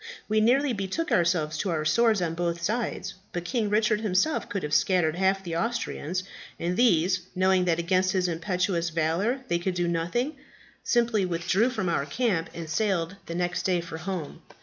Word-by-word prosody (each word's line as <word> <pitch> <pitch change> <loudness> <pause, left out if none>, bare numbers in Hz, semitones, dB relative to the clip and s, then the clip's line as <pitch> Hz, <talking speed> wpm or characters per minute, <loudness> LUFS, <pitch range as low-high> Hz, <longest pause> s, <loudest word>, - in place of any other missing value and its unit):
We 215 0 +2
nearly 260 +4 +3
betook 200 - -3
ourselves 165 -3 +1
to 200 - -1
our 155 -3 -1
swords 220 +3 +3
on 165 -2 -1
both 170 0 -2
sides; 220 +7 -2 0.2
but 175 0 -3
King 225 -1 0
Richard 215 0 +2
himself 215 +9 +1
could 200 -2 -3
have 150 0 -3
scattered 175 -4 +3
half 190 +1 +1
the 170 -3 -4
Austrians, 185 -4 -2 0.4
and 175 +2 -1
these, 185 -5 +3 0.2
knowing 185 0 +3
that 170 -2 +2
against 185 +2 +1
his 185 -1 +1
impetuous 175 0 -1
valour 170 +11 0
they 170 - +1
could 180 +1 -2
do 175 -1 0
nothing, 175 - -1 0.5
simply 235 -4 +2
withdrew 185 +6 +1
from 220 -7 -2
our 155 -4 0
camp, 190 - 0
and 170 -1 -6
sailed 185 +1 0
the 170 - -5
next 175 0 -1
day 180 -2 +1
for 170 -1 -7
home. 175 -3 -5
185 Hz, 180 wpm, -27 LUFS, 170-215 Hz, 0.5 s, nearly